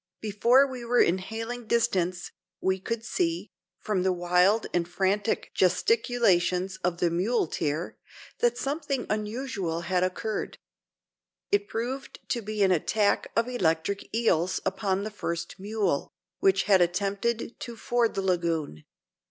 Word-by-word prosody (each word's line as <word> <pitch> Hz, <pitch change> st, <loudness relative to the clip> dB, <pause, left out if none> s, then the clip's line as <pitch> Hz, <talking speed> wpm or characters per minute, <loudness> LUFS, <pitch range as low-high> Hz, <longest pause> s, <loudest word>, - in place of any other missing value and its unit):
Before 235 Hz, +6 st, +4 dB
we 260 Hz, -3 st, -6 dB
were 240 Hz, +1 st, +2 dB
in 180 Hz, +3 st, +4 dB
hailing 225 Hz, +4 st, -5 dB
distance, 185 Hz, -7 st, 0 dB, 0.3 s
we 190 Hz, 0 st, 0 dB
could 230 Hz, +4 st, -4 dB
see, 335 Hz, +5 st, -1 dB, 0.3 s
from 210 Hz, -4 st, -1 dB
the 190 Hz, +1 st, +2 dB
wild 180 Hz, +4 st, +3 dB
and 170 Hz, -1 st, +1 dB
frantic 195 Hz, +4 st, 0 dB
gesticulations 190 Hz, -, +2 dB
of 180 Hz, -2 st, -1 dB
the 170 Hz, -1 st, +1 dB
muleteer, 170 Hz, -5 st, -1 dB, 0.4 s
that 480 Hz, 0 st, +2 dB
something 280 Hz, -2 st, -2 dB
unusual 210 Hz, -5 st, -2 dB
had 180 Hz, +1 st, 0 dB
occurred. 210 Hz, +4 st, -3 dB, 0.9 s
It 205 Hz, 0 st, +2 dB
proved 250 Hz, +5 st, -4 dB
to 240 Hz, -, 0 dB
be 215 Hz, -1 st, -1 dB
an 190 Hz, -, +4 dB
attack 200 Hz, +4 st, +1 dB
of 230 Hz, +1 st, +2 dB
electric 195 Hz, -4 st, -1 dB
eels 185 Hz, -6 st, +1 dB
upon 195 Hz, -1 st, 0 dB
the 215 Hz, -, -4 dB
first 170 Hz, -3 st, -4 dB
mule, 200 Hz, -6 st, -1 dB, 0.3 s
which 190 Hz, 0 st, +3 dB
had 195 Hz, -3 st, +4 dB
attempted 200 Hz, +7 st, -1 dB
to 240 Hz, -2 st, -6 dB
ford 235 Hz, 0 st, +1 dB
the 195 Hz, -, -1 dB
lagoon. 165 Hz, -, -1 dB
200 Hz, 135 wpm, -27 LUFS, 180-235 Hz, 0.9 s, Before